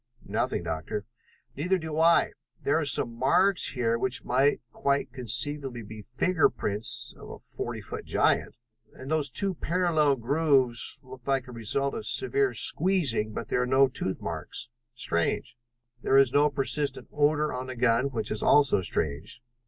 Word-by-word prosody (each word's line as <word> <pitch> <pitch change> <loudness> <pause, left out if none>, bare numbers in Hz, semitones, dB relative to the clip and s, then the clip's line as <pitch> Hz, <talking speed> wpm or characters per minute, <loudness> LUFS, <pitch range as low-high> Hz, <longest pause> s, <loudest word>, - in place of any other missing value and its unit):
"Nothing, - - -2
Doctor." 80 +6 -4 0.5
"Neither 180 +7 0
do 160 -2 -4
I. 165 +1 +4 0.3
There 145 +3 +2
are 155 - -1
some 120 -3 +2
marks 180 +10 +2
here 115 -3 0
which 130 0 -1
might 135 +3 +2
quite 140 +3 -1
conceivably 125 +1 -2
be 110 +1 -10
finger 155 - +1
prints 105 +2 -3
of - - -11
a - - -8
forty - - -6
foot - - -6
giant, - - +1 0.4
and 130 +3 -9
those 155 -2 +1
two 195 -1 +2
parallel 165 -4 +1
grooves 135 -1 +1
look 130 -1 -12
like 135 -2 +1
the 125 - -11
result 125 +4 -1
of 220 - -5
severe 405 0 +1
squeezing, 145 - +2
but - - -6
there 125 - +1
are 125 - -1
no 135 +1 +4
tooth 95 -7 -1
marks. 120 - -5 0.2
Strange. 115 +2 -1 0.5
There 135 - +3
is 135 -2 +4
no 145 +1 +4
persistent 140 0 0
odor 150 +1 +1
on 125 0 -5
the 130 - -6
gun, 120 +1 +2
which 120 -6 -2
is 110 - -1
also 140 -8 +4
strange. 80 - -1
135 Hz, 160 wpm, -27 LUFS, 120-150 Hz, 0.5 s, I